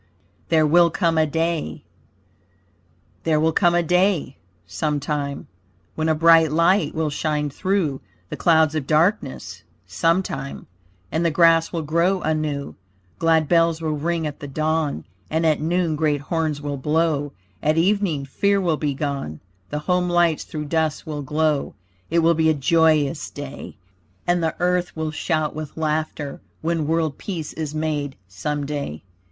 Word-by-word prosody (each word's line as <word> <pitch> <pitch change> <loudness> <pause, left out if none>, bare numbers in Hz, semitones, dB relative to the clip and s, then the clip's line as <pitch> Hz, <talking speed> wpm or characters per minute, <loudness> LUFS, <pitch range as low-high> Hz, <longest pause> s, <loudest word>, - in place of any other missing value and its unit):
THERE 160 -2 +4
WILL 170 +3 +5
COME 165 -1 +1
A 155 - +3
DAY 160 - -2 1.4
There 155 -2 +2
will 160 +1 +3
come 175 +1 +3
a 175 - +3
day, 180 -4 +1 0.3
sometime, 145 - -2 0.5
When 160 0 -1
a 160 - +3
bright 165 -1 +5
light 170 +6 +2
will 160 -2 0
shine 150 -1 -1
through 180 -5 -1 0.3
The - - -4
clouds 160 -2 +3
of 150 -4 -3
darkness, 170 +7 0 0.2
sometime. 165 -6 -1 0.5
And 160 - 0
the 170 - +3
grass 165 +1 +4
will 165 -2 -2
grow 170 +5 +1
anew; 155 -2 -2 0.5
Glad 160 -2 +3
bells 165 -1 +3
will 160 -1 -2
ring 165 +2 -1
at 150 -1 -5
the 145 - -7
dawn; 155 - -1 0.2
And 160 +1 0
at 155 -2 +2
noon 170 0 0
great 150 -2 0
horns 155 -1 -2
will 145 -1 -3
blow; 150 0 0 0.3
At 155 +1 +1
evening 175 -5 +1
fear 200 +9 +1
will 170 -5 +1
be 145 -2 -1
gone; 140 - -3 0.3
The 150 - -3
home 180 -1 +1
lights 175 -2 +2
through 150 -1 -5
dusk 160 -1 -1
will 150 -2 -4
glow. 150 +1 0 0.3
It 170 0 +2
will 165 +1 +5
be 160 0 +2
a 155 - +3
joyous 155 0 +2
day! 145 -1 -8 0.5
And 175 0 +2
the 160 -1 -1
earth 180 0 0
will 160 -1 -2
shout 155 -1 -1
with 155 -1 -7
laughter, 155 -2 -2 0.2
When 165 -2 0
world 160 -3 0
peace 165 -7 -5
is 155 -2 -5
made, 150 -3 -2
some 145 +10 -3
day. 140 - -4
155 Hz, 155 wpm, -22 LUFS, 150-165 Hz, 1.4 s, WILL